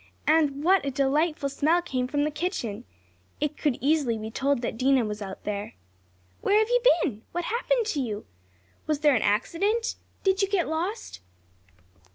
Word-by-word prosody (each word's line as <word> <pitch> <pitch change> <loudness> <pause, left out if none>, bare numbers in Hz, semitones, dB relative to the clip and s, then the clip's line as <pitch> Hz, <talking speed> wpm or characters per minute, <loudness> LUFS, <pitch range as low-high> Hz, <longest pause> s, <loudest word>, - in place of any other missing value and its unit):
And 300 -2 +2
what 380 +3 +4
a 280 - -1
delightful 280 +3 +1
smell 310 +5 +2
came 255 -7 -2
from 290 +2 0
the 305 - 0
kitchen! 290 - -3 0.5
It 300 0 -1
could 290 -6 0
easily 280 -5 +2
be 220 0 -6
told 270 0 0
that - - -2
Dinah 255 0 +3
was 210 0 -5
out 195 -1 -7
there. 205 - -4 0.7
"Where 410 - +3
have 435 +1 +3
you - - +3 0.2
been?" 230 -11 -3
"What 350 - -2
happened 475 +3 0
to 375 -9 -1
you?" 215 -4 -4 0.6
"Was 305 -1 0
there 295 -2 +5
an 225 - +2
accident?" 390 - 0 0.3
"Did 385 0 +2
you 390 - +3
get 385 -3 0
lost?" 350 - -4
295 Hz, 175 wpm, -26 LUFS, 250-350 Hz, 0.7 s, there